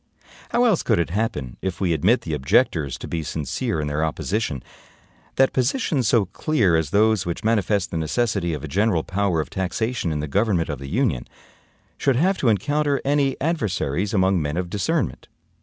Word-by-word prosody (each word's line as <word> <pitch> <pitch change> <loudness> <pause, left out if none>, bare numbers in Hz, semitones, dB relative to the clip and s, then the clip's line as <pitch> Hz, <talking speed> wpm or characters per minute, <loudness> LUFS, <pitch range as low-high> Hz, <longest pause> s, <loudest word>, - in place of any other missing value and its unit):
How 240 - +2
else 220 -8 +3
could 110 - +1
it 85 -1 0
happen 85 - -2
(if 95 -2 -3
we 90 -4 +1
admit 105 +10 +3
the 80 - -5
objectors 75 - +1
to - - -8
be 85 - -2
sincere 80 +1 -2
in 75 - -1
their 75 +1 -1
opposition), 80 - -2 0.7
that 135 0 +3
positions 130 - +1
so 110 -2 +3
clear 100 - +1
as 80 -3 0
those 110 +1 +3
which 85 - -3
manifest 105 -3 +1
the 85 - -2
necessity 85 0 0
of 75 - -8
a - - -4
general 95 +1 +1
power 95 -3 0
of - - -8
taxation 95 +1 -2
in 75 - -2
the 75 - -3
government 95 -1 +1
of 75 -4 -4
the 70 0 -7
Union, 95 - 0 0.7
should 135 - +2
have 185 +9 +2
to 125 - +3
encounter 145 - +1
any 140 -1 +1
adversaries 105 - -1
among 95 -3 +2
men 75 +2 -2
of 90 -1 -3
discernment? 100 -3 -1
95 Hz, 185 wpm, -23 LUFS, 80-120 Hz, 0.7 s, else